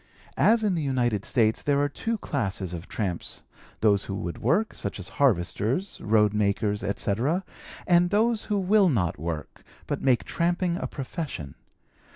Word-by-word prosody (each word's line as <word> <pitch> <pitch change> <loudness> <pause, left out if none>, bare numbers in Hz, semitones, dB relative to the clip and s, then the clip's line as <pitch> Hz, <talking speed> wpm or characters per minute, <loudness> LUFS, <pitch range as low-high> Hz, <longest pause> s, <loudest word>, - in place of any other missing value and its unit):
"As 225 0 +5
in 205 -3 +2
the 165 - -1
United 120 -7 0
States, 110 -3 +2
there 145 -1 +1
are 145 - +2
two 225 +10 -3
classes 95 - -3
of 85 0 -7
tramps 95 -6 -4 0.4
those 100 -3 +3
who 95 - -4
would 85 -2 -5
work, 175 - +1
such 100 0 -4
as 95 - -5
harvesters, 120 - +1
road 105 -1 +3
makers, 105 0 0
etc., 115 - 0 0.4
and 175 0 +4
those 220 +2 +2
who 210 - 0
will 195 0 +4
not 90 - 0
work, 80 -1 -5 0.2
but - - -3
make 125 -7 +3
tramping 175 - 0
a - - -3
profession. 135 - -5
125 Hz, 160 wpm, -26 LUFS, -, 0.4 s, As